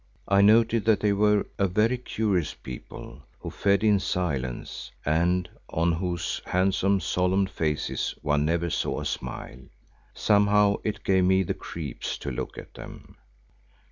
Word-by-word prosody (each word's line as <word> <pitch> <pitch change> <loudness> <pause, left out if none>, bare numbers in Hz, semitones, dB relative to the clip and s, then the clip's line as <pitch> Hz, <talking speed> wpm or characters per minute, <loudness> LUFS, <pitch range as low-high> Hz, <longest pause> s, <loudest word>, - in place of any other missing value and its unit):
I 100 0 +4
noted 115 +2 +4
that 110 -2 +4
they 105 -1 +2
were 105 0 +3
a 100 - +3
very 110 +7 +1
curious 100 - -1
people 65 +1 -10 0.2
who - - -7
fed 100 +1 +1
in 105 -2 +4
silence 70 -11 -3 0.2
and 85 +4 +1 0.2
on 85 +2 +1
whose 85 0 -2
handsome, 95 +1 +2
solemn 95 +2 +1
faces 80 -5 -2
one 75 0 +1
never 85 +2 0
saw - - -1
a - - -5
smile. 60 +1 -5 0.6
Somehow 105 -1 +3
it 110 - -3
gave 95 -1 +3
me 95 +1 +4
the 95 +2 -2
creeps 80 -8 -6
to 70 - -5
look 60 - -5
at - - -10
them. - - -11
95 Hz, 145 wpm, -26 LUFS, 85-100 Hz, 0.6 s, I